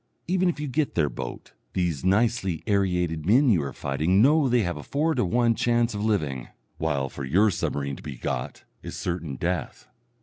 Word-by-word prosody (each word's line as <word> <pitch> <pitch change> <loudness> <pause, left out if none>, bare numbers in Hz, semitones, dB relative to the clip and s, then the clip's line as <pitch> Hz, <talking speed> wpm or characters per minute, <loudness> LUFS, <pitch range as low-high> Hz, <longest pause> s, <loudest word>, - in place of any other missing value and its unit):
Even 185 +1 +2
if 170 - -3
you 150 - -3
get 145 +2 -1
their 75 -4 +2
boat, - - -7 0.2
these 85 -7 -1
nicely 100 -3 +1
aerated 90 -6 0
men 125 - +4
you 90 -7 +3
are 70 -1 -4
fighting 75 +9 0
know 140 +4 +5
they 120 -2 +3
have 85 -2 -2
a 75 - -7
four 155 - 0
to - - +1
one 115 +5 +2
chance 120 0 +1
of 105 0 -3
living; 75 - -1 0.3
while 70 -4 0
for 70 - -7
your 95 +11 +3
submarine 70 -5 -2
to - - -11
be 70 - -7
"got" - - -4 0.2
is - - -7
certain 85 -5 -3
death. 85 -3 -3
95 Hz, 195 wpm, -26 LUFS, 75-120 Hz, 0.3 s, know